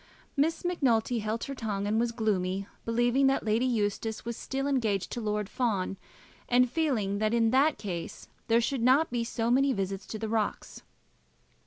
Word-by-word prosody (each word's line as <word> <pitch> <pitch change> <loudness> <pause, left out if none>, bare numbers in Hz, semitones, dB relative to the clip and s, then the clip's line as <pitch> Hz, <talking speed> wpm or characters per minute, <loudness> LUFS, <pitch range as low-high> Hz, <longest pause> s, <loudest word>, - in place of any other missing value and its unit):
Miss 320 +5 0
Macnulty 245 -9 +1
held 215 +2 -2
her 275 - -4
tongue 210 -6 -3
and 215 +2 +1
was 235 0 +1
gloomy, 195 -4 -1 0.2
believing 240 +4 +2
that 270 -3 +1
Lady 225 +4 +2
Eustace 220 -1 -1
was 235 0 -3
still 270 +3 -3
engaged 225 -9 0
to 240 - -3
Lord 210 -1 -1
Fawn, 205 -6 -1 0.5
and 250 +1 +5
feeling 240 -9 0
that 215 +2 +1
in 225 -1 +3
that 285 +4 +3
case 175 -5 -6 0.2
there 230 +1 +4
should 265 +1 -1
not 260 +6 +4
be 240 -1 0
so 230 0 -1
many 270 +2 +3
visits 195 -1 -3
to 220 - -5
the 220 +1 -4
rocks. 220 -1 -2
230 Hz, 175 wpm, -29 LUFS, 210-255 Hz, 0.5 s, and